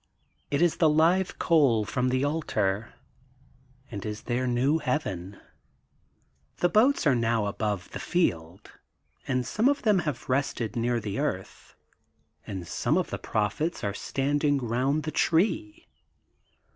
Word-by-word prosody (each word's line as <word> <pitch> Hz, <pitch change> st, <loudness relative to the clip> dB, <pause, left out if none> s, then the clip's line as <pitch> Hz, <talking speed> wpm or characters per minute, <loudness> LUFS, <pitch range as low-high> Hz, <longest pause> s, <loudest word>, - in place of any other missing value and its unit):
It 145 Hz, +4 st, +1 dB
is 175 Hz, -, +2 dB
the 160 Hz, -, +4 dB
live 170 Hz, +5 st, +2 dB
coal 135 Hz, -10 st, +3 dB
from 125 Hz, +4 st, 0 dB
the 130 Hz, +1 st, +1 dB
altar 110 Hz, -9 st, -1 dB, 1.0 s
and 100 Hz, -3 st, -5 dB
is 105 Hz, -1 st, -5 dB
their 125 Hz, +1 st, -1 dB
new 130 Hz, +6 st, +2 dB
Heaven. 105 Hz, -, -3 dB, 1.2 s
The 175 Hz, -, +2 dB
boats 225 Hz, +5 st, +3 dB
are 145 Hz, -, +5 dB
now 115 Hz, -2 st, +1 dB
above 100 Hz, -2 st, -3 dB
the -, -, -6 dB
field, 85 Hz, -, -1 dB, 0.6 s
and 125 Hz, -1 st, 0 dB
some 225 Hz, +5 st, +2 dB
of 285 Hz, -, 0 dB
them 210 Hz, -5 st, +4 dB
have 150 Hz, -7 st, -4 dB
rested 125 Hz, -5 st, -1 dB
near 120 Hz, 0 st, 0 dB
the 105 Hz, -3 st, -4 dB
earth, -, -, -4 dB, 0.7 s
and 95 Hz, -4 st, -6 dB
some -, -, 0 dB
of -, -, -1 dB
the -, -, -3 dB
prophets 110 Hz, -, -2 dB
are 100 Hz, -1 st, -1 dB
standing 145 Hz, +6 st, 0 dB
round 130 Hz, +5 st, 0 dB
the 155 Hz, -, -3 dB
tree. 315 Hz, -, 0 dB
130 Hz, 140 wpm, -27 LUFS, 110-160 Hz, 1.2 s, are